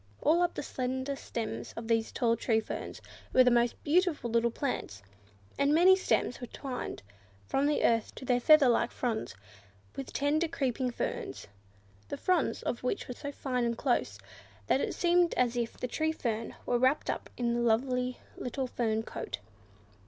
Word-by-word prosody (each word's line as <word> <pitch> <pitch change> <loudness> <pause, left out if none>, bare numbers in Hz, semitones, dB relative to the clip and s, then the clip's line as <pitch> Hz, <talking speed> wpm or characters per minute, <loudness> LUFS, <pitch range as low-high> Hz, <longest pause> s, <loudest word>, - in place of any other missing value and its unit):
All 330 +3 +3
up 350 -1 +1
the - - -3
slender 260 +1 -2
stems 230 -4 -5
of 230 0 -5
these 225 -1 +1
tall 230 -1 +2
tree 225 -1 +1
ferns 220 - -6 0.3
were 255 - +7
the 250 - +4
most 240 0 +3
beautiful 315 -6 +2
little 235 0 +3
plants, 220 - -4 0.6
and 280 +2 +4
many 365 +3 +7
stems 375 - 0
were 245 - -5
twined, 255 - -6 0.4
from 275 - +1
the 295 - +1
earth 230 -1 +1
to - - -8
their 245 -1 +2
feather 305 +2 +7
like 235 0 +3
fronds, 225 - -2 0.6
with 270 - -6
tender 300 +4 +1
creeping 260 -5 -1
ferns—the 100 - -7
fronds 365 -1 +1
of 235 - -2
which 250 - -2
were 250 - -4
so 285 +3 -6
fine 255 -3 -2
and 235 -1 0
close, 240 - 0 0.5
that 265 - +2
it - - -2
seemed 350 0 +3
as 245 -1 +2
if 235 -1 -2
the 250 - -3
tree 315 +5 0
fern 230 -7 -3
were 245 - +1
wrapped 260 +4 +2
up - - -6
in 235 -1 0
a - - 0
lovely 250 +2 +1 0.2
little 260 +2 -3
fern 225 -3 -1
coat. - - -5
250 Hz, 175 wpm, -30 LUFS, 230-280 Hz, 0.6 s, were